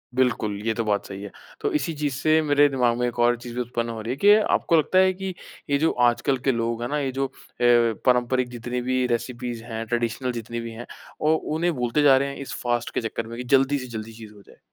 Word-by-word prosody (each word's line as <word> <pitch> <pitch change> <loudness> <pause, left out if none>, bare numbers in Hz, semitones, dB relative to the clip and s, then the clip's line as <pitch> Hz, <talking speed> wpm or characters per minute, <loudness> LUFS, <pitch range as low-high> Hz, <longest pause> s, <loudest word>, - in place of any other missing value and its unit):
बिल्कुल, 110 -5 0
ये 110 - +1
तो 115 - -2
बात 100 -1 0
सही 100 0 -8
है। 100 - -7 0.3
तो - - 0
इसी 165 +2 0
चीज़ 145 -2 -2
से 155 +4 +3
मेरे 145 -1 +4
दिमाग 125 -3 +1
में 125 0 0
एक 120 - -5
और 120 0 +4
चीज़ 120 0 -9
भी 125 - -1
उत्पन्न 120 -1 -3
हो 110 -1 -5
रही 115 +3 -4
है - - -7
कि 205 +4 +6 0.2
आपको 165 - +1
लगता 170 +5 +3
है 190 0 +4
कि, 190 0 -5 0.4
ये 140 - +3
जो 160 +3 +2 0.2
आजकल 130 +3 +1
के - - +6
लोग 115 0 -2
है 120 - -2
ना, 150 0 0
ये 135 -2 -1
जो 135 +1 -1
अ, - - -28 0.7
पारंपरिक 125 0 +2
जितनी 125 +1 -4
भी 130 0 0
रेसिपीज 120 -1 -3
हैं, 115 -1 -5
ट्रेडिशनल 120 +2 -1
जितनी 115 0 -5
भी 115 0 -6
हैं, 115 +2 -8 0.4
औ 155 +1 +3 0.2
उन्हें 170 +2 +1
भूलते 125 +3 0
जा 135 -2 +7
रहे 140 +1 0
हैं 140 - -7
इस 140 - -7
फास्ट 120 -1 0
के - - -1
चक्कर 115 0 -4
में 115 +1 -8
कि 125 - -4
जल्दी 135 +2 +2
से 130 - -7
जल्दी 110 +1 -7
चीज़ 110 -1 -12
हो 100 - -16
जाए? - - -18
125 Hz, 255 wpm, -24 LUFS, 115-140 Hz, 0.7 s, जा